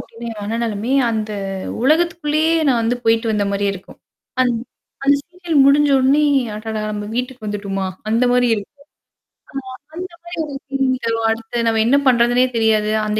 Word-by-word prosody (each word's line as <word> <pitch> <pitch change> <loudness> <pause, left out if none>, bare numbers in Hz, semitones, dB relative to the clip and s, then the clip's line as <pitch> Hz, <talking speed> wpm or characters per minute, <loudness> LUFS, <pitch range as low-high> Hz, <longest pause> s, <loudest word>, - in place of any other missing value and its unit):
அப்டின்னா, 235 +1 -9
என் 210 - -9
மனநிலமை, 225 +2 -2 0.2
அந்த 215 -1 -2 0.5
உலகத்துக்குள்ளேயே 320 0 +2 0.2
நான் 240 -3 +3
வந்து 235 +2 0
போயிட்டு 225 0 +2
வந்த 205 -1 +1
மாரியே 200 0 0
இருக்கும். 190 - -13 0.4
அந் 250 -1 +3 0.5
அந்த 280 +1 +5
சீரியல் 350 -1 -4
முடிஞ்ச 290 +1 +5
உடனே, 275 +3 +3 0.3
"அடடா! 215 0 -4
நம்ம 210 -1 -4
வீட்டுக்கு 250 -1 -4
வந்துட்டோமா?" 200 -2 -3 0.2
அந்த 230 +3 +2
மாரி 245 0 +3
இருக்கும். 225 +7 -9 0.9
ஆ - - -55 0.2
அந்த 365 +2 -4 0.2
மாரி 345 0 -8
ஒரு 295 -2 -7
ஃபீலிங் 265 -2 0
தரும். 225 0 0
அடுத்து 230 +1 -3
நம்ம 225 -1 +2
என்ன 260 +5 +4
பண்றதுன்னே 245 0 +4
தெரியாது. 220 -2 +2 0.2
அந்த 210 0 0
235 Hz, 160 wpm, -19 LUFS, 215-275 Hz, 0.9 s, அந்த